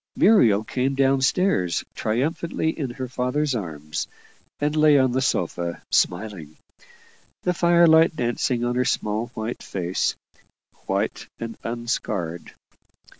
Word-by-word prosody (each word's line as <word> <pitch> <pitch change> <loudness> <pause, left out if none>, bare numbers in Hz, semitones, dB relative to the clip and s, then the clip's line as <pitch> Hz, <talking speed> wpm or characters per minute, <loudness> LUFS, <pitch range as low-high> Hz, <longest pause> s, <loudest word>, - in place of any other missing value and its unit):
Muriel 115 - +5
came 130 +4 -1
down 135 0 +3
stairs 130 - +1
triumphantly 160 +7 -1
in 140 -6 -4
her 130 +1 -5
father's 130 +3 -1
arms, 80 -8 -4 0.5
and 150 +1 0
lay 155 -1 +5
on 130 -2 +3
the 130 +2 0
sofa 85 -7 -1
smiling; 90 -5 -1 0.9
the 180 - +1
firelight 170 -2 +5
dancing 120 -1 0
on 120 - 0
her 125 +1 +1
small 110 -1 -1
white 110 +2 -4
face 90 -1 -2 0.7
white - - -2
and 115 0 -5
unscarred. 115 -8 -3
125 Hz, 120 wpm, -23 LUFS, 105-145 Hz, 0.9 s, Muriel